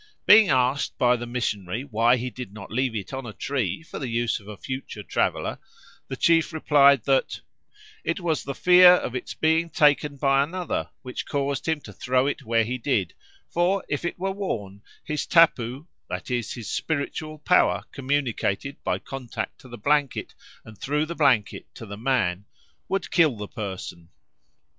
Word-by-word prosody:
Being 210 -2 +8
asked 130 0 +1
by 125 0 +4
the 120 0 -5
missionary 110 -3 -3
why 120 -1 +2
he 125 +1 -4
did 125 -6 -8
not 105 -2 -10
leave 125 0 0
it 105 +4 -5
on 135 -2 -5
a 110 - -7
tree 125 - -2
for - - -8
the 135 - -4
use 115 0 0
of 100 - -18
a 105 -1 -8
future 130 -4 -6
traveller, - - -1 0.5
the 135 - -5
chief 165 +4 +3
replied 140 -5 +4
that 135 -1 +1 0.6
"it - - -1
was 165 -4 -1
the 140 - -5
fear 180 +2 +8
of 150 -8 -1
its 125 - -5
being 160 +1 +2
taken 150 -2 +2
by 135 0 +3
another 175 +4 -3
which 125 -1 -6
caused 140 +1 -2
him 160 -2 0
to 105 - -11
throw 125 +6 +1
it 145 - -2
where 115 0 +1
he 125 +3 -3
did, 110 - 0 0.3
for 180 +3 0
if 145 +2 -3
it 175 - -3
were 195 +2 -2
worn, 105 - -4 0.2
his 150 -1 -3
tapu" 135 -4 +3 0.2
(that 90 +6 -5
is, 120 -4 -2
his 115 -4 -8
spiritual 155 0 -3
power 100 -10 +3
communicated 135 -2 -2
by - - 0
contact 135 -3 -6
to 130 - -14
the 120 - -8
blanket 145 +4 0 0.3
and 110 -2 -13
through 150 +2 0
the 170 - -5
blanket 130 -10 +1
to 115 - -9
the 100 -1 -7
man) 105 -6 0 0.4
"would 195 - -2
kill 155 - +3
the 105 0 -6
person." 95 -5 -7
130 Hz, 175 wpm, -25 LUFS, 115-150 Hz, 0.6 s, Being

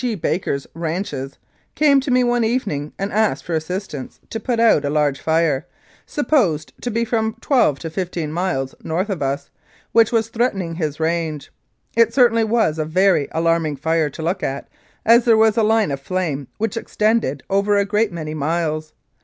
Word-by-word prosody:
G. 240 -3 0
Baker's 160 -5 -2
ranches, 160 -5 -4 0.4
came 290 -2 +5
to 270 - -4
me 250 0 +4
one 240 -1 +2
evening 205 - -1
and 195 +1 -3
asked 215 0 +1
for 175 - -5
assistance 160 -3 -4
to 225 - -3
put 235 +1 -1
out 225 -10 +4
a 140 - -1
large 145 -2 +1
fire, 160 -4 +1 0.4
supposed 225 - +1
to 245 - -2
be 230 +1 0
from 220 -1 -1
twelve 240 - +2
to 165 - -6
fifteen 170 -3 -3
miles 160 -6 -2
north 185 +6 -1
of 185 - -3
us, 140 +1 -2 0.4
which 225 -1 +4
was 225 -1 +1
threaten 230 -3 0
ing 165 -1 -5
his 155 -3 -3
range. 160 -2 -2 0.4
It 230 0 +3
certainly 235 -3 +4
was 220 -8 +1
a - - +1
very 180 -1 +2
alarming 165 -2 +1
fire 160 +2 0
to 160 - -8
look 175 +4 -1
at, 135 +1 -3 0.4
as 230 +1 +6
there 230 -2 +5
was 220 -1 +4
a 230 - +3
line 220 -5 +2
of 140 - -3
flame 150 -5 -2
which 225 0 -2
extended 215 - 0
over 200 +1 +2
a 200 - +2
great 210 +1 +1
many 155 -3 -5
miles. 155 0 -2
180 Hz, 185 wpm, -20 LUFS, 155-225 Hz, 0.4 s, as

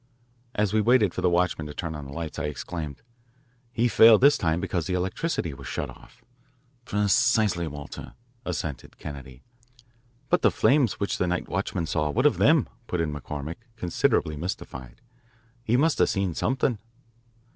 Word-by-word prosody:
As 105 -1 +1
we 110 - +3
waited 110 -4 +4
for - - -3
the 90 - +3
watchman 85 -3 +1
to 75 - -9
turn 85 -2 -4
on 75 -2 -7
the 70 - -9
lights 80 +1 -5
I 75 - -2
exclaimed, 75 0 -5 0.7
"He 120 0 +2
failed 110 0 +7
this 140 +2 +7
time 80 -1 0
because 90 -3 -2
the 90 - -1
electricity 90 - -2
was 70 -1 -10
shut - - -3
off." 120 - -18 0.6
Precisely, 105 -3 +2
Walter," 75 -1 -8 0.3
assented 80 -5 -5
Kennedy. 70 -3 -9 0.8
"But - - +2
the - - +5
flames 135 -6 +3
which 100 - -1
the 90 - +1
night 90 0 -1
watchman 85 - -2
saw, 75 -1 0
what 125 - 0
of 150 - +4
them?" 155 -3 +4 0.2
put 90 - -2
in 80 -3 -1
McCormick, 75 +2 -6 0.2
considerably 85 -5 +1
mystified. 65 -6 -6 0.6
"He 120 0 +2
must 155 +3 +2
have - - +4
seen 95 -4 0
something." 125 - 0
90 Hz, 165 wpm, -26 LUFS, 75-110 Hz, 0.8 s, failed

